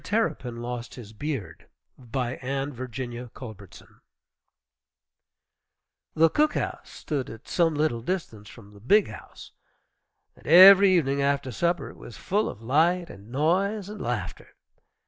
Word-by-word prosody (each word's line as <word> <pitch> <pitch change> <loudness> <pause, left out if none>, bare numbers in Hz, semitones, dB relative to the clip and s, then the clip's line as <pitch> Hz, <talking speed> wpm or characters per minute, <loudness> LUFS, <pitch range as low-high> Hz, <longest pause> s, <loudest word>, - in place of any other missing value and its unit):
TERRAPIN 125 - -2
LOST 120 0 -6
HIS 110 -4 -11
BEARD 110 - -6 0.3
BY 125 0 -4
ANNE 135 +2 -3
VIRGINIA 125 -1 -6
CULBERTSON 110 -7 -12 2.1
The 165 +1 +5
"cook 305 +1 +2
house" - - -4
stood 140 -5 -4
at 115 +3 -12
some 165 -3 +1
little 145 -6 0
distance 115 - -5
from 105 -3 -15
the 100 - -15
"big 200 - +3
house," 105 - -12 0.8
and - - -18
every 190 +4 +9
evening 140 -6 +1
after 140 -2 0
supper 170 +8 -1
it - - -17
was 120 - -11
full 205 +3 -1
of 110 - -10
light 165 +7 +1
and 100 +3 -14
noise 185 - 0
and 210 -1 -8
laughter. 115 -7 -5
135 Hz, 135 wpm, -26 LUFS, 120-170 Hz, 2.1 s, every